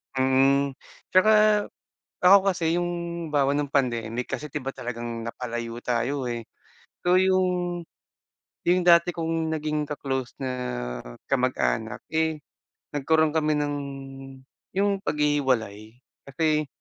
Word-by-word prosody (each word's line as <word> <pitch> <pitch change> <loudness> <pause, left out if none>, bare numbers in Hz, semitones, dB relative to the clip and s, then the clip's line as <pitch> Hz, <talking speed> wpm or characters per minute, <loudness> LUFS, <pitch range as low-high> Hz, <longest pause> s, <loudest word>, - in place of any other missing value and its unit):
Mm, 135 +1 +3 0.4
tsaka 210 +2 +5 0.6
ako 185 +2 +8
kasi 165 -1 0
yung 175 0 0 0.4
halimbawa 140 -2 +3
nung 145 -1 -2
pandemic 120 -3 0
kasi 150 -1 -5
di 150 - -2
ba 135 - -5
talagang 120 -2 -5
napalayo 120 0 -5
tayo, 125 +2 -1
eh, 120 -1 -4 0.6
so 180 +1 +4
yung, 180 -2 +1 0.8
yung 180 +1 +3
dati 170 0 +6
kong 165 -1 -2
naging 150 -1 -1
ka-close 135 -3 -3
na 135 - -3 0.8
kamag-anak, - - 0
eh, 160 -1 +1 0.5
nagkaro'n 155 +2 +2
kami 155 -1 +1
ng 145 -1 -1 1.0
yung 200 0 +2
paghihiwalay 130 - 0 0.3
kasi, 155 +1 +1
150 Hz, 110 wpm, -25 LUFS, 125-170 Hz, 1.0 s, ako